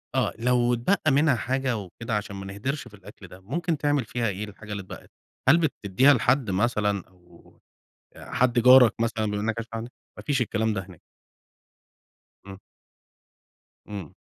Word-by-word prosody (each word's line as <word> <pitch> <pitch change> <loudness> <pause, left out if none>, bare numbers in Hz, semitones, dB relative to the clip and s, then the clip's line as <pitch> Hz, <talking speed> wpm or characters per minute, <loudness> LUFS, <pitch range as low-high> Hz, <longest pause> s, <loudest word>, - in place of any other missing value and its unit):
آه، - - +1
لو 120 0 +2
اتبقى 155 +6 +1
منها 145 0 +3
حاجة 130 +1 -1
وكده 105 +3 -5
عشان 100 -1 -6
ما 95 0 -7
نهدرِش 130 +9 -4
في - - -16
الأكل 100 -1 -13
ده، 90 +1 -13
ممكن 160 - -2
تعمل 145 -3 0
فيها 115 +1 -2
إيه 95 +2 -4
الحاجة 105 +1 -12
اللي 100 -1 -3
اتبقت؟ 95 - -12 0.4
هل 155 - +7
بتديها 135 - +3
لحد 125 -3 +1
مثلًا، 105 -1 0
أو 90 -2 -22 0.6
آآ، - - -12
حد 125 -1 +2
جارك 125 -2 +7
مثلًا 115 -1 0
بما 105 0 -2
انك 110 +1 -1
عايش 115 0 -5
لوحدك؟ 115 +2 -6 0.2
ما - - -9
فيش 140 -3 0
الكلام 110 -1 0
ده 100 - -2
هناك. 90 -4 -15 1.4
امم. 95 -1 -10 1.3
امم. 100 -7 -8
115 Hz, 165 wpm, -25 LUFS, 100-130 Hz, 1.4 s, هل